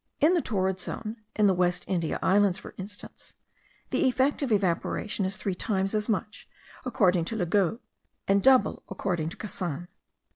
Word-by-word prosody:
In 310 +5 +5
the 350 - +3
torrid 190 -5 -1
zone, 220 +5 -5 0.2
in 210 - +3
the 195 - +5
West 180 0 +1
India 170 -4 -1
Islands 195 -1 +4
for - - -10
instance, 205 +2 -9 0.6
the 315 - +2
effect 260 +4 +1
of 270 -4 -1
evaporation 200 +1 0
is 190 +1 -3
three 195 -1 -2
times 195 +1 -1
as 215 +1 0
much, 215 0 -3 0.4
according 185 -9 +2
to 225 - -4
Le 190 -5 0
Gaux, 195 +3 +2 0.5
and 195 0 +4
double 260 +1 +4
according 175 -5 -2
to - - -10
Cassan. 175 -5 -4
195 Hz, 170 wpm, -28 LUFS, 180-220 Hz, 0.6 s, In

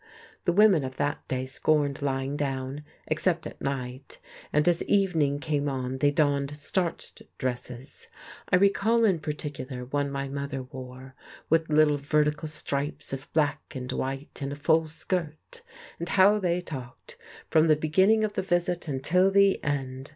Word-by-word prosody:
The - - +3
women 195 -4 +5
of 130 0 -5
that - - -2
day 130 0 -2
scorned 145 +1 +1
lying 135 0 -1
down, 135 0 -3 0.2
except 165 +2 0
at - - -9
night, 130 -1 -4 0.3
and 150 +2 +2
as 175 -1 +3
evening 165 -8 +2
came 145 -1 -1
on 130 -1 -3
they 145 - +4
donned 145 -1 +1
starched 170 +3 -3 0.2
dresses; 125 0 -5 0.4
I - - +4
recall 200 +4 +3
in 190 -6 +3
particular 145 -4 -5
one 140 +2 -1
my 140 0 -3
mother 140 -1 -4
wore, 130 +1 -10 0.4
with 165 0 +3
little 150 -1 +4
vertical 150 +2 0
stripes 145 -2 -3
of 135 +1 -6
black 150 -2 +1
and 130 0 -4
white, 135 +2 -4
and 140 0 -3
a - - -4
full 160 +2 +2
skirt. 165 - -4 0.4
And 170 - -3
how 200 +2 +5
they 180 -2 0
talked, 130 -8 -9 0.4
from 160 0 +5
the 155 - +6
beginning 190 +9 +3
of 215 -1 -1
the - - -1
visit 175 -2 -1
until 160 +7 +2
the 200 0 +4
end! 135 -2 -3
145 Hz, 160 wpm, -27 LUFS, 135-170 Hz, 0.4 s, the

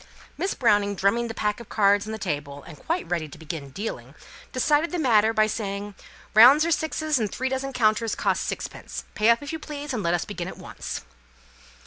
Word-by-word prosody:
Miss 390 - -2
Browning, 205 -4 +2
drumming 215 +5 +1
the 225 - -6
pack 210 0 -1
of 235 - -11
cards 205 0 +3
on - - -4
the 220 - -4
table, 145 -7 -4
and 170 -2 -11
quite 335 +3 -1
ready 165 -3 -2
to - - -12
begin 155 -2 -6
dealing, 205 +11 -6 0.4
decided 295 +5 +2
the 355 - -3
matter 225 -8 +4
by 215 -1 +3
saying, 205 -1 -4 0.4
"Rounds 260 +8 +8
are 335 - 0
sixes, 310 -2 0
and 215 -4 -1
three 260 +1 -2
dozen 265 +1 -2
counters 225 -3 +1
cost - - 0
sixpence. - - -5
Pay 215 +2 +3
up, 235 +4 +4
if 285 - -6
you 320 - -3
please, 295 -2 -6
and 230 - -1
let 170 -2 +1
us 175 - -2
begin 180 -4 -5
at - - -8
once." - - -6
220 Hz, 205 wpm, -25 LUFS, 200-265 Hz, 0.4 s, Rounds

